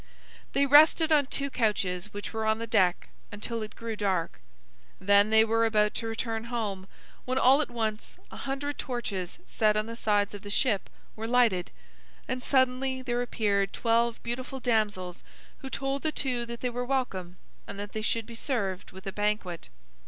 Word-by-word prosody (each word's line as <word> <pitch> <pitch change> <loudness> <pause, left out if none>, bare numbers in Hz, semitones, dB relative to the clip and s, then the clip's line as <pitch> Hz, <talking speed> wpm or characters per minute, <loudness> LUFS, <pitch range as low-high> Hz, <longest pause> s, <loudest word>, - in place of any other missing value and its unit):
They 280 - +3
rested 310 +3 +6
on 290 -3 +4
two 280 0 -2
couches 205 -5 0
which 205 +2 -6
were 220 0 -2
on 220 0 +3
the 230 - -4
deck, 190 -6 +2 0.2
until 225 +3 -4
it 215 - -6
grew 230 -1 -5
dark. 190 - -1 0.6
Then 200 +2 +5
they 220 0 +6
were 225 +1 +2
about 210 -2 +3
to 225 - -3
return 225 0 -3
home, 210 -6 -3 0.4
when 255 +1 -1
all 265 +3 +6
at 300 - -2
once, 220 -3 -3
a - - -9
hundred 280 +1 -4
torches, 205 -8 -3
set 215 -1 +2
on 215 - +1
the 230 +1 -6
sides 205 -3 +1
of 205 - -7
the 205 - -8
ship 210 -1 +1 0.3
were 220 +1 -4
lighted, 230 -7 +3 0.6
and 255 0 -2
suddenly 260 0 +1
there 245 -1 -1
appeared 200 -5 0
twelve 235 0 +2
beautiful 255 +3 -4
damsels 210 -7 -1 0.4
who 270 - -7
told 270 +1 -2
the 315 - +1
two 250 -5 -2
that 235 0 -7
they 250 - 0
were 245 +1 -2
welcome, 195 -9 -2 0.3
and - - -7
that 205 0 -5
they 220 - -3
should 225 +1 0
be 235 - -10
served 205 -6 -2
with 190 +1 -12
a 195 - -3
banquet. 205 - -2
225 Hz, 180 wpm, -28 LUFS, 205-250 Hz, 0.6 s, rested